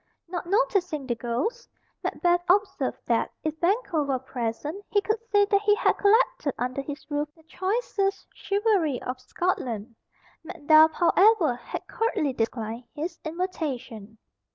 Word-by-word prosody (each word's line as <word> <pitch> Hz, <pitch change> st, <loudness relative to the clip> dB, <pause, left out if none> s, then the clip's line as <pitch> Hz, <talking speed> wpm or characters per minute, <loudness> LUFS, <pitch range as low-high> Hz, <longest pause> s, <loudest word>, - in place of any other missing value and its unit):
Not 345 Hz, 0 st, -5 dB
noticing 380 Hz, -, +1 dB
the 250 Hz, -, 0 dB
ghost, 250 Hz, -, -3 dB, 0.3 s
Macbeth 350 Hz, -1 st, +1 dB
observed 400 Hz, +2 st, +2 dB
that, -, -, +1 dB
if 310 Hz, 0 st, -3 dB
Banquo 370 Hz, -3 st, +1 dB
were 275 Hz, -2 st, 0 dB
present, 260 Hz, -, -4 dB
he 415 Hz, -, +3 dB
could 435 Hz, +2 st, -1 dB
say 410 Hz, -1 st, +5 dB
that 400 Hz, 0 st, +2 dB
he 415 Hz, 0 st, +4 dB
had -, -, +3 dB
collected 420 Hz, -, +3 dB
under 250 Hz, +3 st, -2 dB
his 290 Hz, +1 st, -7 dB
roof 295 Hz, 0 st, -1 dB
the 320 Hz, -, -22 dB
choicest 390 Hz, +3 st, -1 dB
chivalry 400 Hz, -, +1 dB
of 250 Hz, 0 st, -4 dB
Scotland. 250 Hz, -, -2 dB, 0.5 s
Macduff, 315 Hz, 0 st, +5 dB
however, 365 Hz, -, +4 dB
had 240 Hz, -, -7 dB
curtly 400 Hz, -, -1 dB
declined 230 Hz, 0 st, -3 dB
his 330 Hz, +3 st, -4 dB
invitation. 290 Hz, -, -4 dB
320 Hz, 135 wpm, -26 LUFS, 260-400 Hz, 0.5 s, say